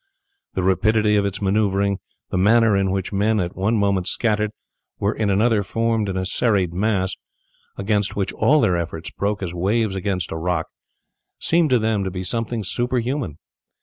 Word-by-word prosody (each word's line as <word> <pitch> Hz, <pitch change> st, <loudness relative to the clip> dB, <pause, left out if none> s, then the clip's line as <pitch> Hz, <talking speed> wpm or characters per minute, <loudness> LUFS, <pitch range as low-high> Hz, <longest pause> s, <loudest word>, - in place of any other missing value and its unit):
The 95 Hz, -, 0 dB
rapidity 105 Hz, +3 st, +3 dB
of 100 Hz, -1 st, +2 dB
its 100 Hz, +1 st, -4 dB
maneuvering, 100 Hz, -1 st, +1 dB, 0.3 s
the -, -, 0 dB
manner 110 Hz, +2 st, +4 dB
in 95 Hz, -1 st, +1 dB
which 95 Hz, +1 st, -2 dB
men, 105 Hz, +2 st, +2 dB
at 90 Hz, -2 st, -2 dB
one 105 Hz, +5 st, +1 dB
moment 100 Hz, -3 st, +1 dB
scattered, 105 Hz, -2 st, +1 dB, 0.5 s
were 100 Hz, +2 st, 0 dB
in 105 Hz, -2 st, -1 dB
another 105 Hz, +2 st, +3 dB
formed 115 Hz, +1 st, 0 dB
in 95 Hz, -, -2 dB
a 95 Hz, -, -1 dB
serried 95 Hz, -4 st, +1 dB
mass, 95 Hz, -1 st, 0 dB, 0.6 s
against 100 Hz, 0 st, 0 dB
which 100 Hz, -2 st, -2 dB
all 150 Hz, +1 st, +3 dB
their 90 Hz, -, +2 dB
efforts 80 Hz, 0 st, -5 dB
broke 100 Hz, 0 st, -2 dB
as 85 Hz, -2 st, -4 dB
waves 100 Hz, +3 st, 0 dB
against 95 Hz, -1 st, -2 dB
a 80 Hz, -, -3 dB
rock, 85 Hz, 0 st, -1 dB, 0.7 s
seemed 165 Hz, -2 st, +2 dB
to 125 Hz, -, +4 dB
them 110 Hz, -3 st, 0 dB
to 95 Hz, -, -2 dB
be 90 Hz, 0 st, -5 dB
something 115 Hz, +3 st, -2 dB
superhuman. 120 Hz, -, -1 dB
100 Hz, 175 wpm, -22 LUFS, 95-110 Hz, 0.7 s, manner